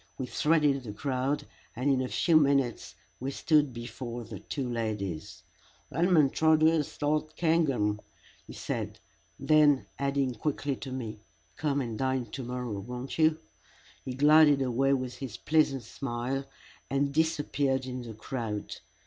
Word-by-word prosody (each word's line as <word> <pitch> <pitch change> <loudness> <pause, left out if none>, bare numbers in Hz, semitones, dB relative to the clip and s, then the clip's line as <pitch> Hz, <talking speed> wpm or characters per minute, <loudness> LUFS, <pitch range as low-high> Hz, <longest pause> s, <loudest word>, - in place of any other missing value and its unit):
We 130 - -3
threaded 150 0 +2
the 110 -5 -7
crowd, 135 +4 -1 0.3
and 125 +4 -2
in 130 -1 +2
a 130 - -1
few 165 +5 +2
minutes 140 -5 +2 0.2
we 130 - -3
stood 150 0 +2
before 120 0 -6
the 110 -3 -8
two 130 +5 -4
ladies. 105 -8 -4 0.5
"'Lowmintrduce 160 -1 +3
L'd 155 +1 0
Cairngorm," 135 -11 +1 0.5
he - - -9
said; - - -4 0.4
then, 145 -1 +4
adding 140 -2 0
quickly 140 +3 -2
to 135 - -7
me, 115 -5 -5 0.4
"Come 145 -2 0
and 115 -4 -4
dine 130 -1 0
to 135 - -5
morrow, 125 -4 -4
won't 125 +8 -6
you?" 155 0 +4 0.7
he 130 - -5
glided 145 0 +6
away 135 +2 +2
with 130 -2 -2
his 130 -6 -6
pleasant 145 -5 +2
smile 130 +3 -3 0.4
and 140 +1 0
disappeared 145 -4 +1
in 130 -1 -5
the 115 -2 -8
crowd. 110 -2 -4
135 Hz, 140 wpm, -29 LUFS, 120-150 Hz, 0.7 s, glided